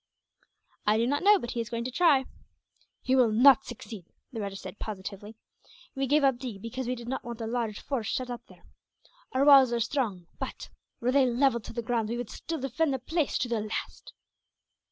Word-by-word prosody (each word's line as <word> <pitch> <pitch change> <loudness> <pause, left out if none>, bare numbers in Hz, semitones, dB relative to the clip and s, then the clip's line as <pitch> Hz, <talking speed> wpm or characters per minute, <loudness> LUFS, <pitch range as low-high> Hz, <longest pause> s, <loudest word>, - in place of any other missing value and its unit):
"I 210 +1 +4
do 230 - +2
not 285 +4 0
know, 415 +2 +6
but 240 -10 -5
he 235 - -2
is 230 - -6
going 235 -1 -3
to 255 - -4
try." 280 -3 +4 0.8
"He 260 - +2
will 250 -4 +4
not 265 +4 +6
succeed," 220 -6 -9 0.3
the 225 - -4
rajah 200 -1 -4
said, 200 - -9
positively. 205 +1 -7 0.6
"We 270 -1 -1
gave 295 +2 +3
up 265 -3 +3
Deeg, 245 -6 -6
because 250 +2 -4
we 250 - -1
did 235 -1 -9
not 265 - -3
want 235 -1 -7
a 225 - -3
large 225 -2 -2
force 245 -7 -3
shut 255 -1 -2
up 240 - -5
there. - - -19 0.7
Our 265 +2 +3
walls 270 -4 +8
are 235 - 0
strong 225 -7 -1
but, - - -6 0.3
were 245 +2 +1
they 270 -1 +4
levelled 240 -2 +1
to - - -8
the 235 0 -3
ground, 230 -2 -1
we 235 - -2
would 240 -3 -5
still 330 -1 -5
defend 270 +3 0
the - - -1
place 310 +4 -1
to 250 - -1
the 235 -2 -1
last." 215 +1 -6
240 Hz, 215 wpm, -28 LUFS, 225-270 Hz, 0.8 s, walls